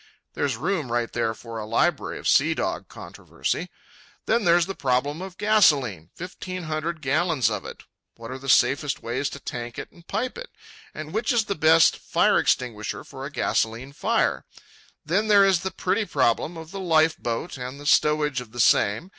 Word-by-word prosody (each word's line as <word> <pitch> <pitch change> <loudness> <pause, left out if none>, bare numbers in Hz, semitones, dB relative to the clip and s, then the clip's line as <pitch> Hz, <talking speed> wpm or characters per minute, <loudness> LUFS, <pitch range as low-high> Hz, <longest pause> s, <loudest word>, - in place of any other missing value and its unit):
—there's 135 -5 -1
room 160 -2 -2
right 120 -1 -1
there 115 -1 -1
for 115 0 -8
a 105 - -5
library 140 +8 0
of - - -5
sea 160 +4 +4
dog 345 +1 -3
controversy. - - -5 0.6
Then 225 -2 +1
there's 170 0 +4
the 195 - -5
problem 140 +2 -1
of 190 -1 -8
gasolene, 140 - +3
fifteen 185 0 -7
hundred 155 0 -4
gallons 145 - +1
of 105 -3 -4
it—what 115 +1 -12
are 130 - -6
the 135 +1 -7
safest 135 +4 +2
ways 130 +4 -2
to 140 - -9
tank 120 -2 -6
it - - -7
and 170 -1 -20
pipe 250 - -3
it? - - -8 0.5
and 155 0 -7
which 220 +6 0
is 235 -3 +2
the 200 - -1
best 160 -1 +5
fire - - +2
extinguisher 115 -5 -1
for - - -8
a - - -11
gasolene 115 +5 -1
fire? - - 0 0.6
Then 190 +8 +1
there 200 -2 +6
is 190 -3 +3
the 190 - -3
pretty 200 +4 -1
problem 165 - 0
of 160 0 -9
the 195 - -6
life 160 -3 +3
boat 120 +8 -3
and 125 +3 -6
the 145 - -11
stowage 150 -3 +2
of 115 -2 -13
the 120 - -8
same. 110 - +3
150 Hz, 185 wpm, -24 LUFS, 125-180 Hz, 0.6 s, there